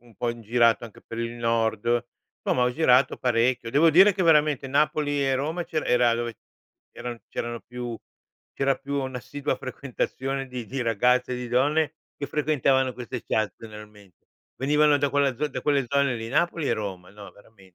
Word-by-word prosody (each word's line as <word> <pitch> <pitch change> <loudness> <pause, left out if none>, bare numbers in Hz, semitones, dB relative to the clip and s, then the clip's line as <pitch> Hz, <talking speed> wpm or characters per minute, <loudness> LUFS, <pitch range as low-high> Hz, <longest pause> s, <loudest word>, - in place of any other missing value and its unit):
un 120 -2 -21
po' 120 - -2
in 115 -1 -5
girato 115 +1 +3
anche 115 - -12
per 115 - -9
il 115 0 -3
nord, 115 0 0 0.4
Insomma 125 - +2
ho 125 - +2
girato 130 -3 +3
parecchio. 120 -1 +1
Devo 150 +6 +5
dire 190 +6 +7
che 185 - -1
veramente 150 -4 +3
Napoli 145 +1 +1
e 135 - +2
Roma 160 +6 -2
c'era 155 - -3
era 120 -1 +3
dove 120 -1 -4 0.6
c'eran 120 -1 -7
c'erano 120 0 -4
più 120 -1 -7 0.5
c'era 135 0 +1
più 140 +1 -3
una 130 -1 -4
assidua 145 +3 -3
frequentazione 135 0 -4
di 125 -2 -6
di 135 +1 -4
ragazze 125 +3 +2
e - - -2
di 125 -1 -5
donne, 145 +5 +1 0.2
che 140 - -4
frequentavano 135 -3 +1
queste 125 0 -6
chat 110 -2 0
generalmen 105 -3 -12 0.5
venivano 150 +2 +4
da 145 -1 0
quella 140 -2 +2
z 150 +5 -1
da - - -4
quelle 140 -3 +1
zone 140 +1 +1
lì 115 0 -6
Napoli 165 +3 0
e - - +2
Roma, 95 -5 -5
no 100 0 -12
veramen 100 -3 -21
125 Hz, 185 wpm, -25 LUFS, 115-140 Hz, 0.6 s, dire